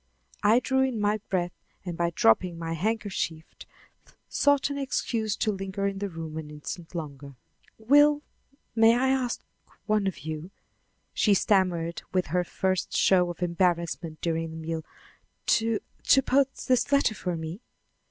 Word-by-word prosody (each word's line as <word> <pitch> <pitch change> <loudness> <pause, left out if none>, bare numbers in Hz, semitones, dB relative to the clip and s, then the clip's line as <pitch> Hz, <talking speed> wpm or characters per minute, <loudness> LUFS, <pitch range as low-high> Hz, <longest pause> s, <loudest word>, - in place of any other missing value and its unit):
I 220 +4 +5
drew 265 +1 +1
in 260 -4 0
my 210 +1 +1
breath 175 -3 0 0.3
and 175 -2 -4
by 170 0 +1
dropping 170 +10 +3
my 165 0 -3
handkerchief 190 -4 -2 0.8
sought 285 0 +2
an 280 - -3
excuse 225 -5 -1
for 215 - 0
lingering 195 0 -2
in 195 - -8
the 200 0 -2
room 165 -2 -7
an 155 -2 -6
instant 160 +4 -8
longer. 140 -4 -7 0.4
"Will 290 +6 +5 0.5
may 225 0 +6
I 260 +1 +2
ask 260 -2 0 0.4
one 210 -2 +1
of 190 - -4
you," 155 +3 -5 0.6
she 205 -2 +3
stammered 180 -4 +1
with 185 -1 +1
her 180 0 +3
first 185 +1 -1
show 180 -2 +4
of 175 +1 -5
embarrassment 170 -2 0
during 165 -1 -1
the 160 - -8
meal, 160 0 -4 0.6
"to 225 -1 +2 0.3
to 270 - +6
post 270 +1 +1
this 255 +1 +2
letter 280 -5 +4
for 180 -4 -3
me?" 160 +6 -6
190 Hz, 150 wpm, -27 LUFS, 165-225 Hz, 0.8 s, may